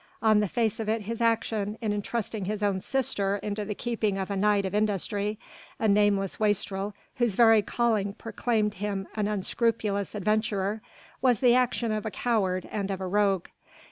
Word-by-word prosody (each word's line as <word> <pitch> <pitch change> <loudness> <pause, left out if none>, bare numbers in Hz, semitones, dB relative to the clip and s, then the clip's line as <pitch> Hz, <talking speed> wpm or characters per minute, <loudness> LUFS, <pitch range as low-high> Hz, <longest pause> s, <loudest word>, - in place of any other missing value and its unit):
On 215 -1 +5
the 210 - +1
face 225 +1 0
of 220 -1 -2
it 220 -1 0
his 230 +3 -4
action 225 -2 0
in 215 -3 -1
entrusting 210 0 -3
his 210 +1 -2
own 195 -2 +1
sister 205 -7 0
into 210 0 -2
the 210 0 -4
keeping 220 -4 -1
of 195 +1 -3
a - - -1
knight 200 0 +2
of 190 - -3
industry, 210 0 0 0.4
a 220 - +1
nameless 200 -2 +2
wastrel 205 -1 0 0.2
whose 240 -5 +1
very 225 -1 +6
calling 215 -3 0
proclaimed 215 -1 -1
him 200 -1 -3
an 210 -1 -1
unscrupulous 210 0 -1
adventurer, 210 0 0 0.4
was 250 -3 +3
the 245 -2 +5
action 245 -2 +1
of 215 0 -2
a - - -1
coward 195 -4 0
and 200 -2 -2
of 195 -2 -2
a 190 - -3
rogue. 195 -1 +1
210 Hz, 175 wpm, -27 LUFS, 200-225 Hz, 0.4 s, very